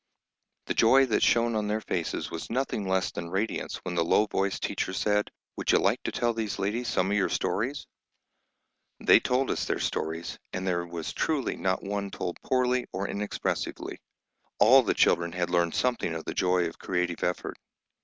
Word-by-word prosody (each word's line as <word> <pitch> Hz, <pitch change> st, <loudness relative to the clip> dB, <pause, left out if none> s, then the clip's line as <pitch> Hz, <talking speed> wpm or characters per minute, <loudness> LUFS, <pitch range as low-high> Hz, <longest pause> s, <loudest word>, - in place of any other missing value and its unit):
The -, -, -1 dB
joy 135 Hz, +4 st, +5 dB
that 115 Hz, -, +1 dB
shone 115 Hz, -1 st, +3 dB
on 105 Hz, -1 st, 0 dB
their 105 Hz, +1 st, 0 dB
faces 85 Hz, -6 st, -3 dB
was 85 Hz, -, -6 dB
nothing 115 Hz, -5 st, -1 dB
less 95 Hz, 0 st, +1 dB
than 85 Hz, -, -6 dB
radiance 95 Hz, +5 st, -2 dB
when 90 Hz, -, -4 dB
the 85 Hz, -1 st, +2 dB
low 105 Hz, +5 st, +3 dB
voiced 95 Hz, -2 st, -1 dB
teacher 95 Hz, -, -2 dB
said, 105 Hz, +2 st, +1 dB, 0.3 s
"Would -, -, 0 dB
you -, -, +7 dB
like -, -, +2 dB
to -, -, -3 dB
tell 120 Hz, -1 st, 0 dB
these 110 Hz, -2 st, -3 dB
ladies 115 Hz, +5 st, -1 dB
some 95 Hz, -3 st, +1 dB
of 105 Hz, -, +2 dB
your 100 Hz, -, +2 dB
stories?" 130 Hz, +8 st, -1 dB, 1.1 s
They -, -, +6 dB
told 130 Hz, +1 st, 0 dB
us -, -, -1 dB
their -, -, -1 dB
stories, 80 Hz, +2 st, -3 dB
and 90 Hz, +1 st, -3 dB
there 85 Hz, -2 st, -1 dB
was 85 Hz, -2 st, -5 dB
truly 150 Hz, -5 st, 0 dB
not 95 Hz, 0 st, -1 dB
one 100 Hz, 0 st, -3 dB
told 90 Hz, -2 st, -5 dB
poorly 125 Hz, -1 st, +1 dB
or 95 Hz, +2 st, -3 dB
inexpressively; 105 Hz, +1 st, -3 dB, 0.6 s
all 125 Hz, +6 st, +7 dB
the 120 Hz, -, 0 dB
children 85 Hz, 0 st, +3 dB
had 90 Hz, -1 st, -1 dB
learned 85 Hz, -2 st, +2 dB
something 120 Hz, -9 st, 0 dB
of 80 Hz, -, -6 dB
the -, -, -3 dB
joy 90 Hz, -1 st, +2 dB
of 80 Hz, -, -9 dB
creative 90 Hz, -2 st, -2 dB
effort. 90 Hz, 0 st, -2 dB
100 Hz, 185 wpm, -28 LUFS, 90-115 Hz, 1.1 s, you